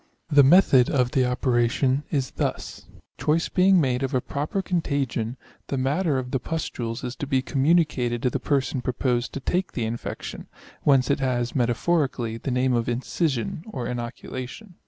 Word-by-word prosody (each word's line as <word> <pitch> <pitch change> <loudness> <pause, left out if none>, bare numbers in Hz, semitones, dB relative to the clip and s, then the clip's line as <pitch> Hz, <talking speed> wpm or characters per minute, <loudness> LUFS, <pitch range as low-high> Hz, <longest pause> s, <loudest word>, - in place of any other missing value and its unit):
The 145 -1 +7
method 135 -4 +6
of 125 -3 +1
the 130 -2 +2
operation 125 +2 +1
is 135 -3 -1
thus: - - -4 0.3
choice 160 +2 +1
being 185 0 +4
made 130 -4 +1
of 135 -1 -1
a - - +4
proper 150 +9 -3
con 180 -3 0
tagion, 130 -6 -2 0.3
the 140 - -2
matter 140 +3 +1
of 125 -1 -4
the 130 - 0
pustules 120 -6 -4
is 125 0 -4
to 145 - -4
be 130 -2 +1
communicated 135 -5 +1
to 125 - +2
the - - -1
person 135 -2 0
proposed 125 -1 -1
to - - -3
take 180 +7 -1
the 120 - -2
infection; 115 +1 -5 0.3
whence 135 -1 +3
it 140 - +1
has, 125 -3 -1
metaphorically, 125 -2 0
the 135 - -4
name 125 0 +1
of 120 -1 0
incision 130 +2 -1
or 125 - -4
inoculation. 125 - -6
130 Hz, 170 wpm, -25 LUFS, 125-145 Hz, 0.3 s, The